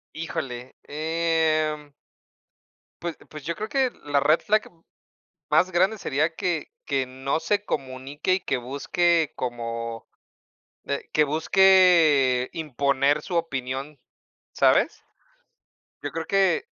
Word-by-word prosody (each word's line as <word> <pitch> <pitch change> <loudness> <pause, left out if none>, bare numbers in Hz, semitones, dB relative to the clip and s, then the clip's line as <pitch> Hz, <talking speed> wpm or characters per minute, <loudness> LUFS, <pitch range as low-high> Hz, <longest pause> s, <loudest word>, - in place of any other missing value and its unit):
Híjole, 135 -6 -5
em 155 -1 0 1.1
pues 170 -1 -4
pues, 155 -2 -10
yo 170 - -2
creo 215 +1 -5
que 265 -1 +1
la 145 -1 +1
red 155 +4 +3
flag 215 0 0 0.8
más 160 +5 +4
grande 190 +5 +2
sería 155 0 0
que 175 -3 -2
que 135 -2 0
no 135 +4 -2
se 205 +3 0
comunique 135 +3 -2
y 190 - -1
que 135 - -1
busque 155 +6 +1
como, 115 -2 -5 0.8
eh, 140 - -3
que 155 - +4
busque 160 -5 +4
imponer 140 -1 +1
su 175 +2 -5
opinión, 135 -2 -3 0.6
¿sabes? - - +3 1.0
Yo - - -3
creo 165 0 -4
que 195 - +2
155 Hz, 115 wpm, -25 LUFS, 135-170 Hz, 1.1 s, más